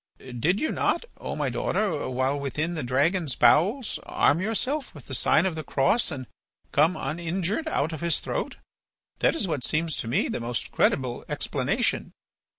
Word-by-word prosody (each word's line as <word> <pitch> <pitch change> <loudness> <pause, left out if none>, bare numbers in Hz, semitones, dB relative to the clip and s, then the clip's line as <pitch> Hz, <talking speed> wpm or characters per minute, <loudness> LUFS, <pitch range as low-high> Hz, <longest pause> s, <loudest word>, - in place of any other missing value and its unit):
Did 130 - -1
you 315 - 0
not, - - 0
O - - -4
my - - -1
daughter, 175 -12 -1
while 130 +2 0
within 150 +5 -2
the 160 - -3
dragon's 140 +4 +1
bowels 195 - +3
arm 165 +5 +2
yourself 255 - -1
with 145 - -11
the 130 - -7
sign 155 +7 +3
of 190 - 0
the 160 0 -5
cross 140 - +2
and 135 -5 -5 0.5
come 155 +5 +4
uninjured 170 - -2
out 160 - 0
of 155 - -6
his 170 -3 +1
throat? - - -3 0.6
That - - +3
is 215 - 0
what 145 -7 -2
seems 160 +3 0
to - - -4
me 115 - +1
the - - -3
most 120 0 -3
credible 130 -3 +1
explanation." - - -1
155 Hz, 170 wpm, -26 LUFS, 135-185 Hz, 0.6 s, come